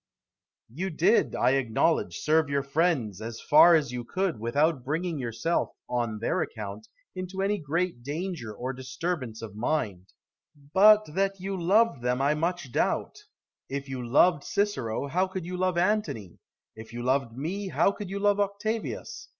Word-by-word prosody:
Brutus. 125 +8 -15
You 190 - 0
did, 185 +7 +2
I 125 - +3
acknowledge, 135 +4 +1
serve 155 -1 +2
your 140 -1 0
friends, 140 - 0
as 115 +1 -6
far 165 +3 +7
as 150 -6 +1
you 125 -1 -4
could, 185 - -2
without 140 +5 +1
bringing 160 +3 -2
yourself, 120 +7 -1
on 120 -3 -1
their 110 - 0
account, 105 - -6 0.3
into 185 +1 -4
any 205 +1 0
great 165 -2 -2
danger 150 - -4
or 125 +5 -4
disturbance 130 -2 -4
of 110 -3 -7
mind: 105 - -2 0.7
but 210 +2 +7
that 195 +1 0
you 195 +1 -3
loved 190 - +2
them 125 +1 0
I 140 +2 +3
much 165 -3 -2
doubt. - - -1 0.5
If 140 0 -4
you 130 -2 -5
loved 145 +6 +4
Cicero, 170 - -1
how 180 +7 0
could 185 -2 -5
you 180 +1 -5
love 185 -1 0
Antony? 180 - -1 0.4
If 110 +1 -11
you 120 0 -5
loved 130 -2 0
me, 190 +8 -3
how 195 - +2
could 200 -1 -7
you 195 - -4
love 205 0 +2
Octavius? 205 - -3
155 Hz, 165 wpm, -27 LUFS, 125-185 Hz, 0.7 s, far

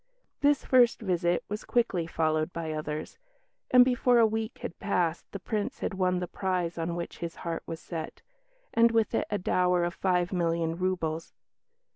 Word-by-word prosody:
This 290 0 +3
first 245 -2 +4
visit 175 -4 0
was 210 +1 -5
quickly 195 -9 0
followed 155 0 0
by 165 -2 -4
others; 155 0 -5 0.5
and 250 -1 +7
before 250 -1 +3
a 230 - +6
week 220 +1 -2
had - - -6
passed 175 -4 -1
the - - -4
Prince 205 +2 -3
had - - -2
won 185 -1 +1
the 180 0 -3
prize 180 -2 -2
on 165 +1 -2
which 170 0 -6
his 170 -1 -5
heart 165 -1 -2
was 165 - -5
set, 165 -3 -7 0.5
and 230 0 +5
with 225 -1 +1
it - - 0
a 205 - 0
dower 180 -1 +2
of 175 0 -1
five 180 -1 0
million 165 -2 0
roubles. 170 -3 -2
180 Hz, 175 wpm, -28 LUFS, 165-210 Hz, 0.5 s, and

